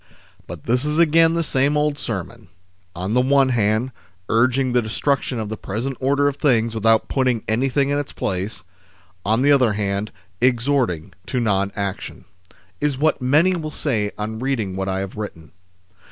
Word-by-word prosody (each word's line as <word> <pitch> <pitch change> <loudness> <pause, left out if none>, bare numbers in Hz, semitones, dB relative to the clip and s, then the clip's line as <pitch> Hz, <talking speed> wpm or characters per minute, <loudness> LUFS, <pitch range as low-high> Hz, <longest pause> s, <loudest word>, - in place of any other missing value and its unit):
" - - -30
BUT 85 -4 -8
this 125 +3 +1
is 150 +1 -1
again 165 0 +4
the 170 - +1
same 140 0 +1
old 150 0 +1
sermon: 110 - -6 0.5
on 95 +4 -3
the 125 - +4
one 135 +1 +3
hand, 115 +1 +1 0.4
urging 125 +2 +2
the 125 - +4
destruction 125 +2 -1
of 110 -2 -4
the 110 - -3
present 120 +7 -4
order 140 +2 +2
of 145 -1 -1
things 115 -6 +2
without 115 0 +2
putting 130 -4 0
anything 135 +5 +1
in 145 0 +1
its 145 - -5
place, 95 0 -4 0.6
on 110 +5 +1
the 145 - +5
other 130 -6 +4
hand, 100 0 -2 0.3
exhorting 120 - +1
to 130 - -1
non 100 -4 +1
action," 100 -1 -5 0.5
is 145 -3 0
what 155 0 +1
many 155 +9 +3
will 155 -3 -4
say 115 -9 -1
on 110 +1 -4
reading 115 -8 -2
what 95 0 -2
I 95 0 -1
have 95 +1 -6
written. 85 -7 -7
120 Hz, 175 wpm, -21 LUFS, 105-140 Hz, 0.6 s, the